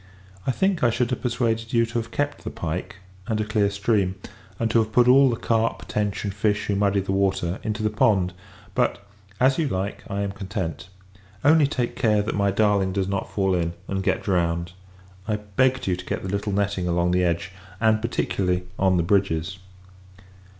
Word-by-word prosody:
I - - +4
think, 190 +3 0
I 120 - +5
should 120 +2 0
have 125 - -2
persuaded 115 -2 -1
you 115 -1 +4
to 120 +1 -2
have 115 - -6
kept 145 0 -2
the - - -4
pike, 85 +3 -4 0.3
and 110 -1 -1
a 110 - 0
clear 105 -2 +1
stream; 100 -2 0 0.4
and 115 -1 0
to 115 - +4
have 110 -1 0
put 120 +2 +4
all 135 +2 +7
the 120 - 0
carp, 115 0 0
tench, 105 -2 -1
and 100 -2 -3
fish 105 0 0
who 100 - 0
muddy 100 0 +2
the 95 - -3
water, 95 -1 0
into 110 0 -3
the 110 - +1
pond. 105 -5 +2 0.4
But, 100 - 0 0.3
as 130 +3 +3
you 160 - +1
like, 100 -3 -3
I 100 0 -2
am 100 -1 -1
content. 95 -4 -5 0.6
Only 155 0 +6
take 125 -4 -2
care, 105 -5 +2
that 105 - -2
my 100 -1 +2
darling 100 -2 +2
does 95 -1 0
not 100 0 -2
fall 95 -2 +1
in, 85 -2 0
and 95 0 -2
get - - 0
drowned. 85 -2 0 0.6
I 105 - +1
begged 115 +6 0
you 95 - +1
to 90 0 -9
get - - -3
the 95 - -4
little 100 +2 -2
netting 100 -2 0
along 85 0 +1
the 90 0 +2
edge; 85 +1 -1 0.3
and, 110 -1 +3
particularly, 90 -6 -1 0.2
on 95 -1 +3
the 85 - +2
bridges. 95 -1 0
100 Hz, 200 wpm, -24 LUFS, 95-115 Hz, 0.6 s, all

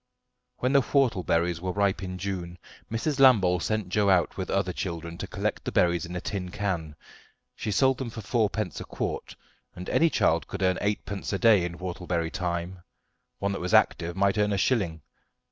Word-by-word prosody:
When 125 +2 0
the 140 - +6
whortleberries 90 - +1
were 90 0 -2
ripe 100 -1 +1
in 90 -1 -5
June, 90 -2 -4 0.3
Mrs. 135 +5 -1
Lambole 100 -10 +6
sent 110 +1 -2
Joe 100 +1 +2
out 90 -3 +3
with 95 - -4
other 95 -2 0
children 85 -2 -4
to - - -4
collect - - -3
the - - -3
berries 85 0 +2
in 90 - -7
a - - -1
tin 90 -1 -4
can; 90 -6 -3 0.6
she - - -4
sold 130 +5 +3
them 130 -3 -3
for 110 0 -7
fourpence 110 -3 -1
a - - -4
quart, - - -4 0.4
and 90 - -8
any 165 - +4
child 80 - +1
could 95 -1 -4
earn 95 -1 +2
eightpence 100 -1 -2
a - - +1
day 105 -4 +5
in 85 0 -4
whortleberry 90 -2 -3
time; 90 0 -3 0.6
one 100 0 -1
that 100 - -4
was 90 +5 +1
active 85 -5 +2
might 100 +2 +2
earn 105 0 +2
a - - 0
shilling. 90 - 0
95 Hz, 190 wpm, -27 LUFS, 90-105 Hz, 0.6 s, the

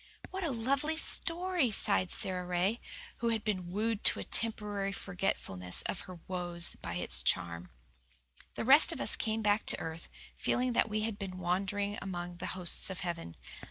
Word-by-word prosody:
"What 380 0 -4
a 330 - 0
lovely 275 +6 0
story," 340 -3 +4
sighed 200 -3 +2
Sara 185 0 -1
Ray, 180 +6 -1 0.4
who 235 - -1
had 225 -2 -1
been 185 -5 -2
wooed 215 +2 -1
to - - +4
a - - -4
temporary 210 -3 +2
forgetfulness 135 - -1
of - - -3
her 180 -2 -9
woes 175 -2 +1
by 85 - -7
its 90 - -1
charm. 85 -1 -1 0.9
The - - -3
rest 275 +5 +7
of - - -6
us - - +3
came 220 0 -2
back 205 +1 +1
to - - +4
earth, 160 0 -7 0.3
feeling 250 0 0
that 225 - +2
we 215 0 -1
had 215 -1 -3
been 190 -2 -6
wandering 200 +3 -2
among 175 -2 -5
the 180 - -5
hosts 180 +2 +2
of 190 - -6
heaven. 165 - -5
200 Hz, 175 wpm, -32 LUFS, 175-225 Hz, 0.9 s, rest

